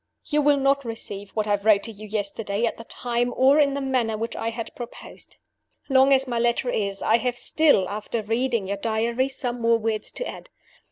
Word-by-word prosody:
"You 300 0 +1
will 290 0 +4
not 275 0 +2
receive 205 -4 -6
what 215 -1 0
I 210 - +1
wrote 205 0 +3
to 225 - -4
you 215 0 -10
yesterday 205 +1 -2
at 230 - -2
the 230 - -10
time 245 +1 -2
or 270 +3 +5
in 280 -2 +3
the 280 - -2
manner 250 -5 0
which 230 +2 -4
I 225 - -2
had 230 0 -6
proposed. 240 -1 -10 0.5
Long 265 0 +5
as 270 0 +5
my 240 -2 -1
letter 240 +1 +1
is, 200 -2 -1
I 225 - +4
have 245 0 -2
still 290 -13 +3
(after 215 +2 -4
reading 230 0 0
your 200 +1 -3
Diary) 230 +4 0
some 245 -2 -4
more 230 0 +4
words 220 -1 -3
to - - -4
add. - - -9
230 Hz, 210 wpm, -24 LUFS, 215-260 Hz, 0.5 s, or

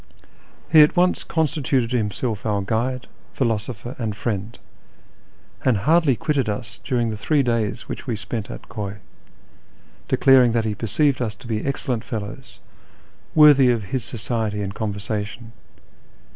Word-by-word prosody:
He 160 -2 +9
at 150 - +5
once 180 +1 +2
constituted 140 -6 0
himself 110 -1 -1
our 105 -2 0
guide, 120 +5 -1 0.3
philosopher, 115 0 -2
and 110 -4 -2
friend, 105 0 -3 1.1
and 125 -5 +3
hardly 150 - +3
quitted 140 -3 0
us 105 +1 -5
during 120 -4 0
the 110 - -5
three 145 +5 +2
days 115 -4 0
which - - -7
we 115 - -1
spent 105 +1 -5
at - - -9
Khuy, 100 -2 -5 1.1
declaring 130 -3 +5
that 115 -1 +1
he 110 - -1
perceived 130 +6 +1
us 110 -3 -2
to 105 - -15
be 110 -2 -2
excellent 130 -4 -2
fellows, 110 +4 -7 0.8
worthy 145 -4 +7
of 115 -3 +1
his 130 -3 0
society 110 -3 -3
and 100 0 -4
conversation. 105 +2 -4
115 Hz, 140 wpm, -22 LUFS, 105-130 Hz, 1.1 s, He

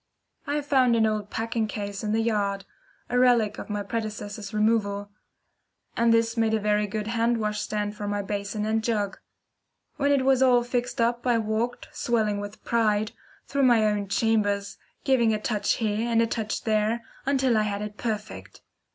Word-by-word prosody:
I 290 +1 0
found 260 -4 +3
an 225 -1 +3
old 215 -1 -1
packing 225 0 -1
case 205 -1 -5
in 210 - -1
the 225 +1 +1
yard 200 -3 -1 0.4
a 245 - +1
relic 235 -4 +3
of - - -8
my 205 -1 -2
predecessor's 210 -2 -5
removal 210 -2 0 0.8
and 235 0 +3
this 230 0 +2
made 225 -1 +2
a - - +1
very 210 0 +1
good 210 +1 -3
wash 225 - -3
hand 220 -3 0
stand 210 -1 -2
for 210 -1 -5
my 205 0 -1
basin 205 +1 -3
and 220 0 0
jug. 210 -4 -1 0.8
When 285 -1 +2
it 275 -2 +2
was 265 -1 +4
all 250 -2 +5
fixed 245 +1 -2
up 235 +1 +1
I 240 -1 +4
walked, 225 +2 -2
swelling 215 -4 0
with 205 +1 -8
pride, 215 -3 +1 0.3
through 280 - -1
my 240 -4 +5
own 205 -1 0
chambers, 205 -1 0 0.2
giving 235 -5 +3
a - - -3
touch 215 -1 0
here 220 0 -1
and 230 -1 +3
a 230 - +4
touch 220 -2 -3
there 220 +1 +1 0.2
until 265 -3 +2
I 215 - +3
had 205 -1 -2
it 210 0 -7
perfect. 215 -2 -5
220 Hz, 180 wpm, -26 LUFS, 210-235 Hz, 0.8 s, all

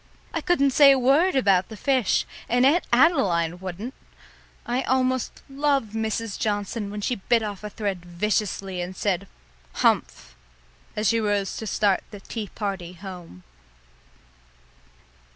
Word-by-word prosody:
I - - -1
couldn't 315 -7 +2
say 280 +1 +7
a 270 - +4
word 280 +8 +3
about 195 -7 +3
the 220 - -9
fish 260 -1 +1 0.2
and 245 +2 +3
Aunt 315 +6 +4
Adeline 195 - +3
wouldn't! 190 +7 -6 0.7
I 245 +2 0
almost 260 -1 0
loved 275 -5 0
Mrs. 220 -1 -2
Johnson 205 0 -2
when 210 +1 -5
she 245 +4 -1
bit 230 +3 +1
off 205 -1 -5
a 210 - -4
thread 200 -4 -3
viciously 190 +1 -2
and 180 +1 -5
said, 195 -1 -1 0.5
"Humph," 65 - 0 0.6
as 210 -2 +1
she 230 - +2
rose 205 -3 0
to 220 - -5
start 200 -1 +1
the 205 - -10
tea 210 +2 -6
party 195 -4 -4
home. 175 - -10
210 Hz, 140 wpm, -24 LUFS, 190-255 Hz, 0.7 s, say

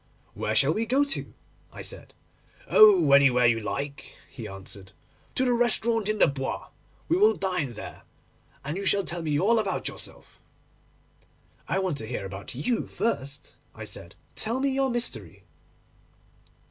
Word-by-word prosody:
'Where 110 - -2
shall 140 +6 +4
we 225 +4 -2
go 265 +4 +3
to?' 285 -1 -4 0.4
I - - -9
said. - - -8 0.5
'Oh, 190 -9 +7
anywhere 135 -3 +6
you 115 -1 +4
like!' 140 +6 -5
he 120 -5 -7
answered—'to 95 - -7
the 250 - +3
restaurant 235 -2 +2
in 215 - 0
the - - +6
Bois; 135 -1 -3 0.4
we 340 - +2
will 425 +3 +5
dine 180 -10 -2
there, - - -9 0.6
and 150 +5 -3
you 200 - -4
shall 200 0 +3
tell 170 -1 -3
me 150 -2 0
all 225 +6 +3
about 200 -4 -2
yourself.' - - -9 1.3
'I - - 0
want 185 -6 -1
to 110 - -6
hear 115 -4 -4
about 95 +4 -8
you 165 - -1
first,' 140 -11 -3 0.2
I - - -8
said. - - -9 0.2
'Tell 230 +4 -1
me 275 0 +1
your 270 0 +1
mystery. 240 -1 -3
175 Hz, 155 wpm, -27 LUFS, -, 1.3 s, Oh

